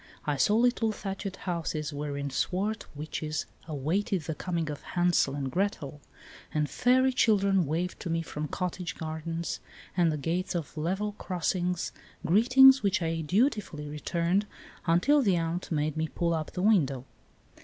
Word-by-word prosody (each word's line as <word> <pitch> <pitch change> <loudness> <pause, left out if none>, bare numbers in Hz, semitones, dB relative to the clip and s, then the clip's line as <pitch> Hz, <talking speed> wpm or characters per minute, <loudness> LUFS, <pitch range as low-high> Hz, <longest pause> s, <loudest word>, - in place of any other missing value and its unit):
I 150 - +1
saw 205 +9 +3
little 235 -1 +3
thatched 195 -1 -5
houses 160 -5 -3
wherein 145 -1 -3
swart 200 +10 -1
witches 155 0 -3 0.2
awaited 160 +5 -1
the 160 - -3
coming 165 -1 -2
of 145 - -7
Hansel 175 -6 +1
and 135 -2 -3
Gretel, 170 -7 -2 0.5
and 150 -1 0
fairy 255 - +3
children 195 - +3
waved 170 +5 -2
to 175 - -5
me 165 0 0
from 150 -1 -4
cottage 180 +1 -3
gardens 165 +1 -4 0.4
and 175 -3 +3
the 155 - -2
gates 170 +6 -2
of 165 -3 -4
level 190 +7 -1
crossings, 180 0 -1 0.3
greetings 255 +9 +7
which 200 -3 +1
I 165 0 -1
dutifully 185 - 0
returned 170 +6 0 0.4
until 245 - +4
the 200 -8 +3
aunt 165 +2 -2
made 155 -1 0
me 160 0 -1
pull 170 +1 -1
up 155 -2 -3
the 180 - -2
window. 140 - +3
170 Hz, 150 wpm, -29 LUFS, 155-195 Hz, 0.5 s, greetings